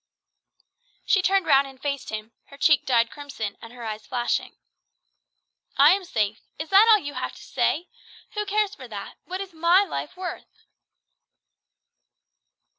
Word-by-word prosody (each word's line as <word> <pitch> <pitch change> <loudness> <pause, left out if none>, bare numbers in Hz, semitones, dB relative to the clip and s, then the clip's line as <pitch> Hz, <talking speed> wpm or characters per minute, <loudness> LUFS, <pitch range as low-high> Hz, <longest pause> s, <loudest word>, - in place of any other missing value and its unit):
She 390 - +3
turned 385 0 +2
round 275 -1 +4
and 265 -1 -14
faced 280 -1 -3
him 215 +1 -6
her 280 - -15
cheek 300 +1 +3
dyed 235 -2 +3
crimson, 270 -8 -6
and 230 - -11
her 245 -1 -10
eyes 215 -1 -5
flashing, 245 -1 -2 1.2
"I - - +8
am 385 0 +1
safe! 215 - -1 0.2
Is 310 +1 -5
that 400 +3 +7
all 440 - +9
you 290 -7 -6
have - - -4
to - - -13
say? 345 +4 0 0.5
Who 420 -1 -3
cares 415 0 +1
for 255 - -10
that? 205 -3 -8
What 370 +2 -5
is 390 -2 -8
my 340 +4 +4
life 375 - -5
worth?" 370 -1 -8
290 Hz, 155 wpm, -25 LUFS, 240-380 Hz, 1.2 s, all